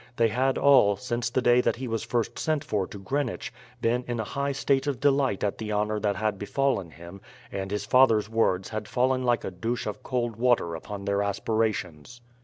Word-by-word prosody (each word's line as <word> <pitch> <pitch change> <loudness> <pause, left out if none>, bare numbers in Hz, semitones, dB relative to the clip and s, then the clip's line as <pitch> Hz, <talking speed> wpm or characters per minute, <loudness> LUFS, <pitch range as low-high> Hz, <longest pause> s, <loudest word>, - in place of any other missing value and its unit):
They 115 -1 +3
had 130 +4 +1
all, 130 -8 +5
since 120 +3 -3
the 125 +1 0
day 120 +1 +5
that - - +1
he 130 +1 -5
was 115 -1 -2
first 120 -2 -2
sent 155 -2 0
for 100 -8 -1
to - - -9
Greenwich, 125 +3 -3 0.3
been 120 +2 +1
in 120 -1 -3
a - - 0
high 140 +6 -2
state 135 0 0
of 140 -4 -1
delight 135 -6 +2
at 100 - -1
the 110 -1 -4
honour 105 +1 0
that 105 -1 0
had 105 -2 -1
befallen 105 -4 0
him, 85 +5 -12 0.3
and 95 -1 -4
his 100 0 -3
father's 115 -3 +4
words 105 -4 +1
had 110 -1 -5
fallen 130 +1 +1
like 120 -2 +1
a - - -4
douche 115 +7 -3
of 105 - -5
cold 120 -3 -2
water 120 -8 +2
upon 100 +4 -7
their 100 0 +1
aspirations. 100 -1 -2
115 Hz, 205 wpm, -27 LUFS, 100-125 Hz, 0.3 s, all